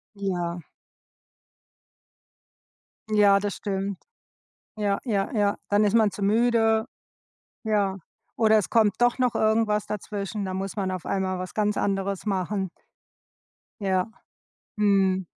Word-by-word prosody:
Ja. 175 -3 -3 2.5
Ja, 205 -2 +5
das 205 -1 -2
stimmt. 195 -1 -3 0.7
Ja, 205 -2 0
ja, 205 -6 0
ja. 205 -2 +2
Dann 205 +1 +4
ist 205 - +1
man 215 -2 +4
zu 195 +2 -7
müde. 225 +1 +3 0.8
Ja. 200 -3 +1 0.4
Oder 220 -1 +5
es 205 - -1
kommt 215 -4 +3
doch 245 +1 +3
noch 250 -2 +1
irgendwas 215 -1 +2
dazwischen, 205 0 -4
dann 185 -1 -3
muss 195 0 -4
man 195 -2 -1
auf 185 -2 -5
einmal 190 -1 -1
was 185 0 -6
ganz 210 -1 +1
anderes 195 0 -1
machen. 195 -1 -1 1.1
Ja. 190 +2 0 0.7
Mhm. 195 -3 +2
200 Hz, 120 wpm, -25 LUFS, 190-215 Hz, 2.5 s, Ja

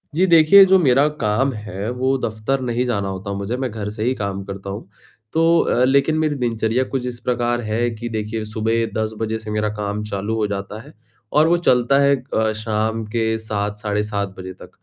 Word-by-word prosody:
जी 185 - +4
देखिए, 170 +3 +8
जो 190 0 +5
मेरा 140 -2 +4
काम 115 +6 +1
है 105 -1 -5
वो 130 +2 0
दफ़्तर 110 +3 -2
नहीं 125 0 -1
जाना 100 -5 -1
होता 95 +1 -5
मुझे, 100 +5 -3
मैं 130 -1 -2
घर 105 -1 -4
से 105 +1 -5
ही 125 +3 +1
काम 100 -2 -3
करता 100 0 -7
हूँ, 100 +2 -6 0.5
तो 165 +1 +4
अ, 125 - +2
लेकिन 140 +4 +2
मेरी 155 -2 +1
दिनचर्या 120 -1 0
कुछ 130 -2 -2
इस 120 -1 -6
प्रकार 120 -1 -1
है 115 +2 -1
कि 120 +2 -6
देखिए 110 0 -3
सुबह 110 +2 0
10 110 0 -2
बजे 110 0 -1
से 110 -1 -7
मेरा 105 0 0
काम 105 0 -3
चालू 105 +1 -3
हो 110 -2 0
जाता 100 +1 -5
है 145 +6 -15 0.4
और 155 +2 +5
वो 175 +1 +4
चलता 135 -4 +3
है 140 0 +4 0.2
अ, 110 0 +2
शाम 110 +1 -2
के 110 +1 -1
7, 105 -1 -3
साढ़े 105 0 -1
7 100 -2 -3
बजे 95 0 -7
तक, - - -14
110 Hz, 210 wpm, -20 LUFS, 105-125 Hz, 0.5 s, देखिए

